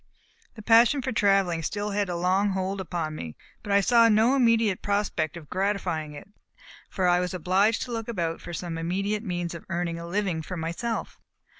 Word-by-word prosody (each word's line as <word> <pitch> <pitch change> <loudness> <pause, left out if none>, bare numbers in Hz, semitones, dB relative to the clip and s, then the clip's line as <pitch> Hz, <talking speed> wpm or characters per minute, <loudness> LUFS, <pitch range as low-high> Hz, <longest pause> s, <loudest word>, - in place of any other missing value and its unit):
The 215 - -10
passion 235 +5 +5
for 260 - -2
travel 195 -6 +2
still 205 +5 -3
had 200 -1 -1
a - - -2
strong 190 +3 +1
hold 190 +1 -2
upon 165 -3 -3
me, 80 - -7 0.3
but 205 - -6
I 200 0 +5
saw 230 +3 +5
no 220 +4 +4
immediate 230 -6 +2
prospect 200 -6 -1
of 155 -3 -11
gratifying 185 -5 -2
it, 145 - -10 0.6
for 185 -3 0
I 175 0 +4
was 180 +1 -2
obliged 190 +6 +2
to 245 - -8
look 225 -1 -4
about 170 -8 -3
for - - -8
some 170 0 -5
immediate 195 +5 -1
means 175 -5 -3
of 170 - -8
earning 170 -2 -2
a 170 - -7
living 180 -3 -1
for 180 +3 -6
myself. 170 +8 -4
190 Hz, 190 wpm, -26 LUFS, 170-210 Hz, 0.6 s, passion